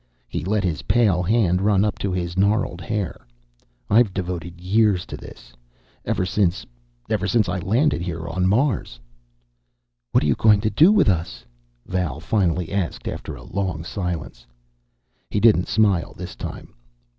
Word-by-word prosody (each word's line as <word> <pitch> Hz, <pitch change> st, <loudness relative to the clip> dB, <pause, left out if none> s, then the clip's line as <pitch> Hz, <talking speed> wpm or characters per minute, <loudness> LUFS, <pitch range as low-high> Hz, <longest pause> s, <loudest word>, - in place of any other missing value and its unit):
He -, -, -4 dB
let 100 Hz, +3 st, 0 dB
his 85 Hz, -1 st, -1 dB
pale 100 Hz, -5 st, +2 dB
hand 90 Hz, -2 st, +2 dB
run 100 Hz, 0 st, +3 dB
up 105 Hz, -, -1 dB
into 100 Hz, -, -2 dB
his 85 Hz, -1 st, -3 dB
gnarled 100 Hz, -2 st, +1 dB
hair. 100 Hz, -, -4 dB, 0.6 s
"I've 105 Hz, -2 st, +3 dB
devoted 85 Hz, -2 st, -4 dB
years 95 Hz, 0 st, +2 dB
to -, -, -7 dB
this. -, -, -13 dB, 0.5 s
Ever 90 Hz, -, 0 dB
since 90 Hz, 0 st, 0 dB, 0.4 s
ever 100 Hz, -2 st, -1 dB
since 110 Hz, +1 st, +2 dB
I 90 Hz, +1 st, -2 dB
landed 115 Hz, -, +1 dB
here 85 Hz, -1 st, -4 dB
on 90 Hz, +2 st, 0 dB
Mars." 105 Hz, -, 0 dB, 1.1 s
"What -, -, +3 dB
are -, -, +1 dB
you 70 Hz, -, +4 dB
going 105 Hz, -, +4 dB
to 110 Hz, 0 st, 0 dB
do 160 Hz, -, +6 dB
with 210 Hz, -3 st, +4 dB
us?" 85 Hz, -3 st, -1 dB, 0.4 s
Val 90 Hz, -6 st, -2 dB
finally 90 Hz, -2 st, 0 dB
asked, 95 Hz, -4 st, -2 dB
after -, -, -5 dB
a -, -, -12 dB
long 90 Hz, -5 st, -3 dB
silence. 85 Hz, -, -5 dB, 0.8 s
He 105 Hz, -, 0 dB
didn't 105 Hz, -5 st, +4 dB
smile 100 Hz, -5 st, +1 dB
this -, -, -7 dB
time. -, -, -8 dB
95 Hz, 155 wpm, -22 LUFS, 85-105 Hz, 1.1 s, do